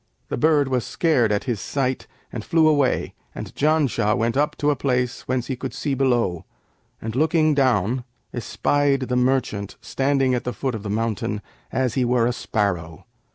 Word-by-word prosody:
The - - -2
bird 150 0 +3
was 130 -3 0
scared 130 -10 +2
at 105 - 0
his 120 -6 -2
sight 130 -2 -2 0.3
and 115 - -4
flew 160 +3 +3
away, 145 -4 +2 0.2
and - - -7
Janshah 145 -8 +2
went 115 +1 0
up 145 +2 +1
to 145 0 +2
a - - +1
place 125 -2 -1
whence 130 -1 0
he 130 - -3
could 130 0 -6
see 145 - -2
below, 120 -10 +1 0.6
and 110 +1 -5
looking 155 +2 +3
down, 125 -3 +2 0.3
espied 140 +3 +1
the 125 -1 -1
merchant 125 -6 0
standing 135 -1 +1
at 125 - -1
the 125 - -3
foot 135 -2 -2
of 110 - -4
the 100 - -6
mountain, 105 -1 -1 0.3
as 130 -3 0
he 130 - +1
were 120 -1 +2
a 120 - +1
sparrow. 90 -10 -2
125 Hz, 180 wpm, -23 LUFS, 115-140 Hz, 0.6 s, bird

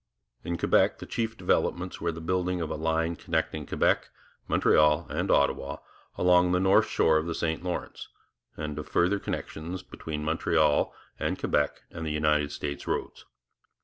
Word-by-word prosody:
In 85 0 -2
Quebec - - +3
the - - -8
chief 115 -1 -3
developments 90 0 0
were 85 0 0
the 80 0 -8
building 90 +1 0
of 80 -2 -3
a - - -2
line 80 +1 0
connecting 80 -3 -2
Quebec, - - +1 0.4
Montreal, 75 +1 +4
and - - -1
Ottawa 70 0 +2 0.4
along 90 0 +4
the 90 - +3
north 95 +1 +4
shore 80 -1 +3
of 80 +1 -1
the 85 - -2
St 80 0 -2
Lawrence, 90 -1 -4 0.5
and 75 -1 -4
of 75 - -7
further 95 +4 +2
connections 85 +1 -5
between 75 -1 -6
Montreal 75 -2 +2 0.3
and - - -1
Quebec 75 0 0
and 80 -2 -4
United 75 -1 +1
States 70 0 -5
roads. - - -3
80 Hz, 155 wpm, -28 LUFS, 75-90 Hz, 0.5 s, Montreal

